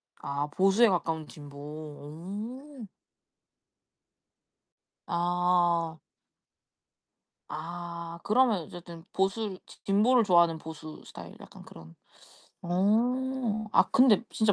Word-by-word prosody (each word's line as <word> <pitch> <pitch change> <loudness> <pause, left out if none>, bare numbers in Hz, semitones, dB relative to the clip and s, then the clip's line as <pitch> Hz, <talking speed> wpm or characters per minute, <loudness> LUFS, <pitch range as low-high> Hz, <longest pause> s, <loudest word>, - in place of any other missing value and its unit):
아 140 +1 -3
보수에 195 +9 +4
가까운 160 -4 -1
진보. 145 -2 -12
오. 180 - -8 2.2
아. 175 -1 +1 1.5
아 170 +1 -6
그러면 220 -5 +3
어쨌든 170 +1 -11
보수 195 +1 0
지 - - -16
진보를 225 +5 +4
좋아하는 170 -4 +4
보수 155 0 -9
스타일 - - -10
약간 - - -13
그런 80 0 -14 0.7
어 225 +5 +1
아 - - +5
근데 255 -5 +5
진짜 220 -2 +3
175 Hz, 180 characters per minute, -29 LUFS, 160-220 Hz, 2.2 s, 아